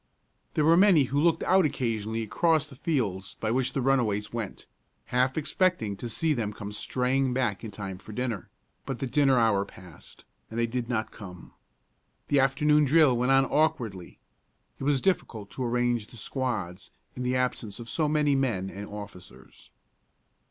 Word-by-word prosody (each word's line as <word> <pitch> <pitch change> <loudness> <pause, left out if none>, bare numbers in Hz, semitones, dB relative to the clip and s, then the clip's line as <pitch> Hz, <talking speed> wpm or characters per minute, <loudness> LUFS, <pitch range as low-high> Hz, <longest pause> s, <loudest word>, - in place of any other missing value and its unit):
There 150 - +2
were 165 +1 +6
many 185 -6 +6
who 145 - +3
looked 170 0 +2
out 190 0 +4
occasionally 115 -6 -1
across 160 +6 +1
the 135 - -12
fields 110 - -2
by 110 - -1
which 130 +1 0
the 135 - -1
runaways 115 -7 +1
went, 115 -4 -5 0.5
half 130 +2 +2
expecting 155 - +1
to 120 - -5
see 160 +6 0
them 110 -6 -2
come 105 -1 -7
straying 125 +4 0
back 120 -6 -1
in 110 - -5
time 95 -2 -7
for 110 - -12
dinner; 120 -3 -3 0.4
but 135 - -3
the 135 - -3
dinner 135 0 +3
hour 110 -4 +3
passed, 90 -4 -15 0.2
and 115 - -4
they 120 - +3
did 120 +1 -3
not 110 -3 -1
come. 90 -4 -11 0.8
The 145 - +4
afternoon 150 +3 +3
drill 145 -2 +5
went 125 +2 +1
on 135 0 +5
awkwardly. 125 - -1 0.6
It 135 - -4
was 140 -2 +2
difficult 110 - -1
to 130 - -4
arrange 120 -2 0
the 120 - -13
squads 110 -7 -3 0.3
in 125 - -6
the 125 0 0
absence 125 -4 -2
of 115 - -8
so 150 +5 0
many 150 -1 +2
men 115 -9 0
and 100 +1 -7
officers. 90 -11 -11
125 Hz, 175 wpm, -27 LUFS, 105-140 Hz, 0.8 s, were